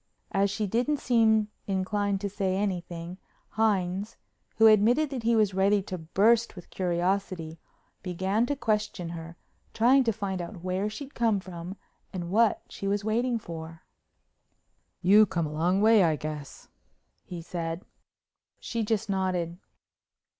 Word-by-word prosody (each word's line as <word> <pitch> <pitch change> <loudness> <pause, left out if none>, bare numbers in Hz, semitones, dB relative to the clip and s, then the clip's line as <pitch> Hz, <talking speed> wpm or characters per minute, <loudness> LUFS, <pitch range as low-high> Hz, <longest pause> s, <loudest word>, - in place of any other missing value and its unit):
As 200 +1 +2
she 210 +2 -2
didn't 245 +9 0
seem 220 -4 +3 0.2
inclined 195 +1 -1
to 205 - -1
say 190 -1 -1
anything, 180 -2 -3 0.3
Hines, 200 -2 0 0.4
who 225 - +5
admitted 230 +8 +5
that 260 -3 -3
he 230 +1 +2
was 210 -3 +3
ready 195 +1 +2
to 185 -2 -6
burst 215 +9 +2
with 180 - -12
curiosity, 180 -2 -1 0.4
began 190 +6 0
to 285 - -1
question 210 -7 -1
her, 170 0 -8 0.4
trying 255 +4 +5
to 230 - +3
find 195 -4 -3
out 175 0 -8
where 185 +3 -1
she'd 275 +6 -8
come 225 -4 +1
from 180 0 -8 0.3
and 175 -2 -5
what 225 +2 +3
she 195 - -6
was 200 +1 0
waiting 235 +2 +1
for. 165 -5 -8 1.2
"You 205 +4 +7
come 170 -3 -1
a 150 - -5
long 180 +6 +1
way, 220 -2 +6
I 160 -3 +3
guess," 150 -1 -7 0.6
he 175 - -7
said. 165 0 -4 0.7
She 230 -1 -3
just 220 0 -1
nodded. 185 -3 -1
195 Hz, 145 wpm, -28 LUFS, 175-220 Hz, 1.2 s, You